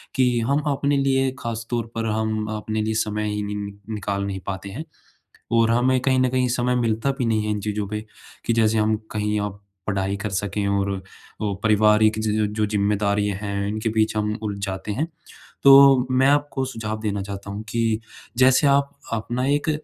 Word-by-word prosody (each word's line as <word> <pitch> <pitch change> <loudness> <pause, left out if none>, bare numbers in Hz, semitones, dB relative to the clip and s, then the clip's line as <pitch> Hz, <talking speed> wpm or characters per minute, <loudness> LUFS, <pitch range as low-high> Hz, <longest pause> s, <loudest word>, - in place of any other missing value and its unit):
कि 125 -2 +3
हम 145 +2 +2
अपने 140 +1 +1
लिए 135 -1 +2
खास 115 -3 -4
तौर 115 -2 -2
पर 115 0 -2
हम 110 0 -1
अपने 110 +1 -2
लिए 110 +1 -1
समय 105 0 -2
ही 105 0 -2
नि 105 0 -4 0.4
निकाल 100 -1 -2
नहीं 95 -1 -4
पाते 95 0 -4
हैं। 140 +12 -6 0.7
और 115 -1 +4
हमें 125 +2 +3
कहीं 130 0 +2
न 130 0 +3
कहीं 130 0 +1
समय 125 0 +1
मिलता 115 +2 +1
भी 125 - 0
नहीं 110 -2 +1
है 105 - -1
इन 105 - -1
चीज़ों 105 -1 -2
पे, 105 +1 -5 0.4
कि 115 - +2
जैसे 110 -1 +3
हम 110 0 +2 0.2
कहीं 105 0 -1
आप 100 0 -5 0.2
पढ़ाई 100 -1 0
कर 105 +2 -4
सकें 100 +1 -2
और 100 0 +1
अ, - - -9 0.4
पारिवारिक 105 +1 +3
ज 110 0 -1 0.3
जो 110 -1 +1
ज़िम्मेदारियाँ 100 -1 0
हैं, 100 -1 -2
इनके 110 +2 -2
बीच 110 0 +1
हम 105 0 0
उलझ 105 -2 -3
जाते 95 +1 -4
हैं। 145 +10 -1 0.6
तो 135 -2 +8
मैं 130 +1 +4
आपको 145 -1 +1
सुझाव 110 -4 -4
देना 100 -2 -2
चाहता 100 0 -7
हूँ 105 +2 -5
कि, 115 0 0 0.4
जैसे 130 +3 +5
आप 140 0 +3 0.2
अपना 120 +3 -2
एक 145 +2 +1
110 Hz, 190 wpm, -23 LUFS, 105-125 Hz, 0.7 s, तो